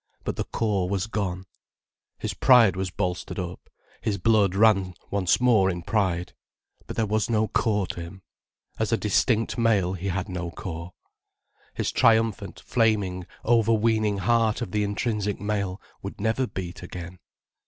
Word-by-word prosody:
But - - -3
the - - -3
core 100 -5 -1
was 95 -1 0
gone. 95 -4 -3 0.7
His - - -3
pride 115 -8 +5
was 95 0 -2
bolstered 90 +2 -3
up, 90 -2 -6 0.3
his 105 -2 -1
blood 100 -1 +3
ran 100 -4 +3 0.2
once 95 -4 +2
more 115 -6 +4
in 85 -2 -4
pride. 90 -4 0 0.5
But - - -6
there 115 - +1
was 110 +1 0
no 110 -1 +2
core 105 -4 +1
to 85 - -6
him: 90 +3 -10 0.6
as 110 0 0
a 115 - +3
distinct 115 +3 +1
male 100 -6 +2
he 95 +1 -4
had 95 +1 -2
no 90 -3 -4
core. 85 0 -7 0.8
His - - -1
triumphant, 110 -3 +2
flaming, 105 -6 0 0.2
overweening 110 -2 +2
heart 110 +3 +2
of - - -7
the 105 +1 +1
intrinsic 105 0 -1
male 100 -2 -2 0.2
would - - -7
never 115 +4 0
beat 90 -4 -6
again. 90 0 -8
100 Hz, 155 wpm, -25 LUFS, 90-110 Hz, 0.8 s, pride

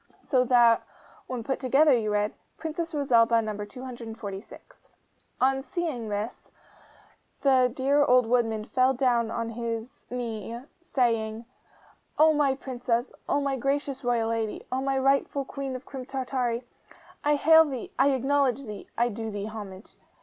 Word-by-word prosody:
So 255 -3 +2
that 235 -2 +5 0.5
when 250 -2 -4
put 265 +3 -2
together 275 +3 +4
you 220 -3 0
read, 210 0 0 0.2
'PRINCESS 325 +1 -4
ROSALBA. 230 -5 +4
NO. 210 -1 -4
246.' 225 -3 -9 0.5
On 270 +1 +2
seeing 265 -5 -3
this, 210 +3 -4 0.9
the 260 -3 +4
dear 275 +3 +2
old 250 -3 +5
woodman 225 -2 +1
fell 260 +2 +2
down 240 -3 +2
on 230 0 -3
his 230 +2 -5
knee, 230 -2 -4 0.2
saying, 230 -7 0 0.7
'O 310 +1 +6
my 285 -3 +2
Princess, 245 -2 -2 0.2
O 285 - +2
my 275 -1 0
gracious 275 +1 -2
royal 235 -2 +1
lady, 225 -2 -2
O 260 +1 0
my 270 0 0
rightful 275 +1 +1
Queen 270 -1 -5
of 255 - -8
Crim 260 -2 -8
Tartary, 255 -3 -2 0.6
I 295 0 +3
hail 320 +2 +7
thee 270 -6 -5
I 270 +2 +5
acknowledge 275 0 +1
thee 210 -3 -8
I 240 +1 +3
do 225 0 -5
thee 205 -1 -4
homage! 210 -2 -9
250 Hz, 145 wpm, -27 LUFS, 230-275 Hz, 0.9 s, hail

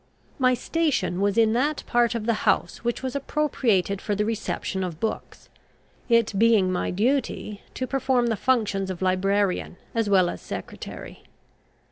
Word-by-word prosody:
My 255 -1 +4
station 295 - 0
was 200 +1 +1
in 225 -1 +4
that 285 +5 0
part 240 -1 +2
of 225 -2 -3
the 230 - +2 0.2
house - - +1
which 240 +2 -2
was 260 +1 -3
appropriated 245 -10 0
for 205 - -1
the 210 +1 0
reception 210 -3 -2
of 170 -3 -5
books, 220 - -4 0.6
it 230 -2 +3
being 220 -5 +4
my 180 - -1
duty 215 -1 -1
to 260 - -2
perform 260 -2 +1
the 230 -1 +1
functions 205 -5 0
of 185 0 -4
librarian 190 0 +1 0.2
as 225 -3 0
well 190 -3 +5
as - - -5
secretary. - - -8
225 Hz, 155 wpm, -25 LUFS, 195-250 Hz, 0.6 s, well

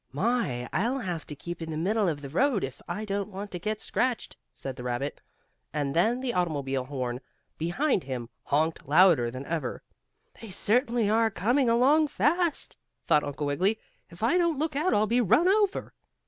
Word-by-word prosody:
"My! 145 - 0
I'll 240 +7 +1
have 180 - -4
to 150 - -6
keep 175 +4 -7
in 165 - -5
the 155 - -3
middle 200 +5 +1
of 145 -4 -2
the 140 - -6
road 240 - +2
if 135 -2 -5
I 215 - -4
don't 200 0 -2
want 200 +1 -7
to 180 - -5
get 215 +4 -2
scratched," 250 -2 -1 0.2
said 135 -2 -6
the - - -8
rabbit. 125 +3 -3 0.5
And 145 -2 -1
then 225 +9 +2
the 255 -2 -2
automobile 140 -7 -1
horn 130 -2 -4 0.4
behind 180 - 0
him 125 -3 -4 0.2
honked 155 +2 0
louder 155 -5 +5
than 130 +3 -7
ever. 155 -6 -3 0.6
"They 225 - -8
are - - -10
certainly 235 +2 +1 0.3
coming 245 +6 +2
along 275 +7 +4
fast," 335 +2 +1 0.3
thought 150 -3 +4
Uncle 145 +1 -4
Wiggily. 185 +10 +1 0.3
"If 170 +3 -10
I 260 +11 +3
don't 340 -4 +2
look 305 0 -1
out 315 +6 +2
I'll 210 - +3
be 235 +3 +2
run 290 - +4
over." 405 0 +1
190 Hz, 185 wpm, -28 LUFS, 145-245 Hz, 0.6 s, louder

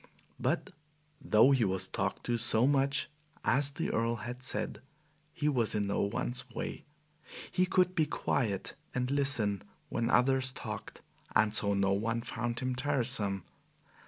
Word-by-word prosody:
But - - -1 0.5
though 115 +1 +5
he 130 -4 +3
was 95 -2 +1
talked 95 +1 -3
to 120 -1 -1
so 115 0 +4
much, 140 +1 +2 0.4
as 140 +2 +4
the 140 - -3
Earl 115 +1 0
had 120 +3 -7
said, 125 -4 0 0.5
he 150 - -2
was 120 -8 +1
in 105 -1 0
no 100 - -1
one's 125 +5 -2
way. 120 - -6 0.7
He 185 0 +2
could 180 0 +2
be 160 -4 +1
quiet 105 -8 -1 0.2
and 125 +1 -1
listen 135 -9 +2 0.3
when 115 0 -1
others 130 +1 +3
talked, 125 - -7 0.3
and 105 -1 +3
so 100 -2 +3
no 100 0 +2
one 115 +3 -1
found 120 0 -4
him 130 0 -1
tiresome. 125 -8 0
120 Hz, 150 wpm, -31 LUFS, 105-135 Hz, 0.7 s, though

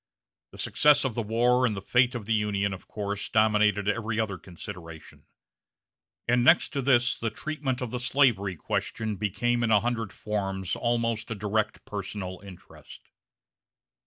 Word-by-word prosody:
The - - -13
success 150 -2 +3
of 130 - -1
the 115 - -2
war, 120 +3 +2
and 110 -5 +1
fate 125 +1 +3
of 115 -4 -5
the 115 - 0
Union, 100 -2 0
of 95 - -10
course 100 -1 -4
dominated 105 -2 +3
every 110 0 -1
other 100 -4 -2
consideration; 85 -2 -10 1.0
and 120 0 +3
next 160 +7 +5
to 140 - -2
this 125 -2 +3
the 115 - -1
treatment 140 -2 -3
of 120 - -5
the 125 - -3
slavery 120 -7 +2
question 110 +6 -3
became 120 +4 0
in 120 - +1
a 105 -2 +5
hundred 115 -3 -2
forms 95 -3 -3
almost 115 -2 -1
a 115 - -3
direct 105 +1 -2
personal 95 -2 -5
interest. 95 -3 -14
110 Hz, 155 wpm, -27 LUFS, 100-120 Hz, 1.0 s, next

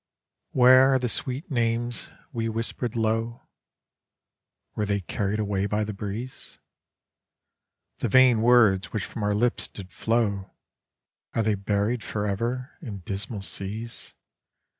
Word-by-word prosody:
Where 130 +1 +7
are - - +5
the 125 -1 -1
sweet 130 +7 -2
names 120 -1 0 0.2
we 115 -1 -1
nhispered 115 +1 -2
low, 115 +1 0 1.3
Were 105 - -1
they 100 -1 0
carried 100 +3 -2
away 100 -2 0
"by 105 +1 0
the 105 0 -4
breeze? 105 +6 -5 1.4
The - - -1
vain 130 -4 +6
words 110 -5 +5
which 105 -4 -2
from 115 - -7
our 105 0 +1
lips 120 +3 +1
did 95 -2 -11
flow 105 -4 0 0.9
Are 115 - +2
they 110 0 +2
buried 105 +4 0
forever 115 +6 -3
in 105 - -7
dismal 100 +3 -3
seas? 110 +5 -4
110 Hz, 125 wpm, -26 LUFS, 100-120 Hz, 1.4 s, Where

